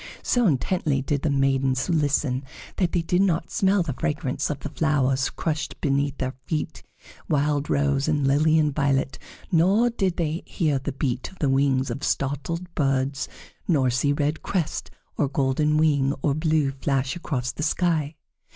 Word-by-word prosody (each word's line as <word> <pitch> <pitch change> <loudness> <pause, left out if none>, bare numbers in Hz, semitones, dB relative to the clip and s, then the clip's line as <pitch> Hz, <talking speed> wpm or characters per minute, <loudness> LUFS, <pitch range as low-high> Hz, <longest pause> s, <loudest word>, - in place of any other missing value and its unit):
So 245 -3 +2
intently 145 -2 0
did 140 0 -1
the 155 - 0
maidens 135 -1 +1
listen 145 -5 +1 0.3
that 180 -3 +1
they 175 - 0
did 180 +2 +1
not 175 -4 +1
smell 195 -3 +2
the 150 -5 -3
fragrance 150 -2 -2
of 145 -2 -4
the 150 - -4
flowers 140 -4 +1
crushed 155 -3 -3
beneath 140 0 0
their 130 -1 -2
feet, 155 0 -3 0.5
wild 145 -1 +1
rose 140 0 +1
and 150 -3 +1
lily 155 +3 +4
and 150 -2 +2
violet, 135 -2 0 0.3
nor 195 +8 +4
did 195 -6 -1
they 165 0 -1
hear 150 -7 0
the 140 +2 -4
beat 130 -2 -2
of 190 - -18
the 145 - 0
wings 135 -1 +2
of 145 - -5
startled 165 +7 -2
birds, 135 -1 0 0.4
nor 135 -7 +3
see 125 +4 +1
red 145 +1 0
crest, 175 -6 -2 0.3
or 145 - +2
golden 140 +2 +1
wing, 145 -3 +2
or 145 - +2
blue, 155 -2 +1
flash 135 -1 -1
across 125 -8 -2
the 155 - -7
sky. 155 -2 0
145 Hz, 165 wpm, -24 LUFS, 135-160 Hz, 0.5 s, lily